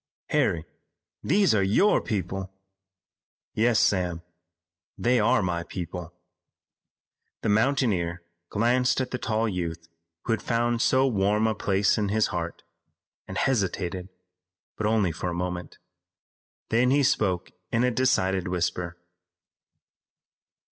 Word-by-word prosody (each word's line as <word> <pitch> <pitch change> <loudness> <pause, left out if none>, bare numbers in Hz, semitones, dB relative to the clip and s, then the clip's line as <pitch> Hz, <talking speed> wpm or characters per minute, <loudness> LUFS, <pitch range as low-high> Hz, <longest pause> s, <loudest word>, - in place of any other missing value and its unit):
"Harry, 80 -2 +1 0.6
these 195 - +3
are 105 - +3
your 105 - +3
people." 95 -1 -3 1.0
"Yes, 115 0 +3
Sam, 90 -3 +1 0.7
they 125 +1 +2
are 115 +1 +3
my 85 -1 -1
people." 85 -1 -6 1.3
The 110 - +1
mountaineer 105 -7 +1 0.3
glanced 125 +4 +2
at 130 -1 -2
the 125 - -3
tall 110 +1 0
youth 85 -4 -4 0.4
who 115 - 0
had 115 - -2
found 120 0 0
so 130 +2 +3
warm 105 -2 +2
a 110 - +2
place 100 0 +1
in 105 -2 0
his 110 +1 +2
heart, - - -4 0.6
and - - -6
hesitated, 95 -6 -1 0.7
but 105 - -1
only 105 -5 +2
for 85 +3 -4
a 85 - -3
moment. 90 0 -4 0.9
Then 120 +3 +3
he 140 +2 +3
spoke 95 -8 +1 0.2
in 115 - +2
a 125 - +3
decided 95 -7 +1
whisper. 90 -1 -2
105 Hz, 120 wpm, -26 LUFS, 90-120 Hz, 1.3 s, these